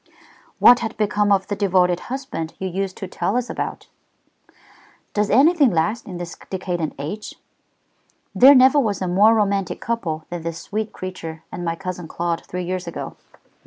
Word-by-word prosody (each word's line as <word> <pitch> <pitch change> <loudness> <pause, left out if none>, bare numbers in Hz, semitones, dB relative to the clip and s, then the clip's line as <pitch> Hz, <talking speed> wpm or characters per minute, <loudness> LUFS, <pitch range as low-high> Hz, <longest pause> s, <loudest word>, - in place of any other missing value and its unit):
"What 245 +1 +7
had 225 -1 -4
become 210 -1 +1
of 195 -1 +3
the 205 - -3
devoted 180 -3 +2
husband 260 -12 -5
you 190 - -3
used 190 +1 -3
to 190 - -6
tell 200 +4 -1
us 250 -1 -2
about?" - - -4 1.3
"Does 210 -1 +1
anything 285 - +5
last 175 +6 -1
in 180 -3 -6
this 175 0 -6
decadent 180 -4 -3
age? 160 +10 -6 1.0
There 275 +3 +8
never 260 +3 +6
was 215 -7 0
a - - -1
more 205 +5 +5
romantic 200 -4 0
couple 170 -10 -3
than 175 -1 -4
that 165 +1 -4
sweet 210 +6 -4
creature 165 -4 -7
and 175 - -6
my 165 -1 -1
cousin 180 -1 -6
Claude 170 +1 -2
three 180 0 -4
years 185 +1 -4
ago. - - -6
190 Hz, 165 wpm, -21 LUFS, 175-220 Hz, 1.3 s, There